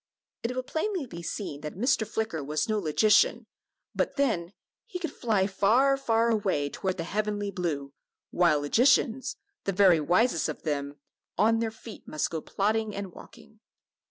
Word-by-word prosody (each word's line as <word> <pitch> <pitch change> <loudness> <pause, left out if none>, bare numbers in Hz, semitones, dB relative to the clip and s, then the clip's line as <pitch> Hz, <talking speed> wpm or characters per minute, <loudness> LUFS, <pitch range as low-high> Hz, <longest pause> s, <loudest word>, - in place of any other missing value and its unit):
It 240 +2 -3
will 255 - -2
plainly 340 +3 -2
be 170 -8 -9
seen 165 -4 -5
that 150 - -6
Mr. 220 +1 +1
Flicker 220 -8 -3
was 150 +2 -1
no 215 -1 0
logician, 215 +7 +3 0.5
but - - -1
then, 220 - 0 0.4
he 440 - -5
could 335 -5 -4
fly 215 -6 +1
far, 225 +8 +3
far 230 -3 +1
away 190 -10 0
toward 190 -1 -3
the 165 - -2
heavenly 205 +2 -2
blue, 155 -7 -3 0.4
while 170 -5 +3
logicians 245 - +2 0.3
the 195 - +1
very 185 -3 +5
wisest 175 - +2
of - - -6
them 145 -2 -2 0.4
"on 225 +2 +3
their 225 -1 0
feet 220 0 -12
must 155 - -2
go 160 -1 -3
plodding 215 +3 -1
and 200 -2 -5
walking." 225 +3 -15
205 Hz, 160 wpm, -28 LUFS, 170-230 Hz, 0.5 s, very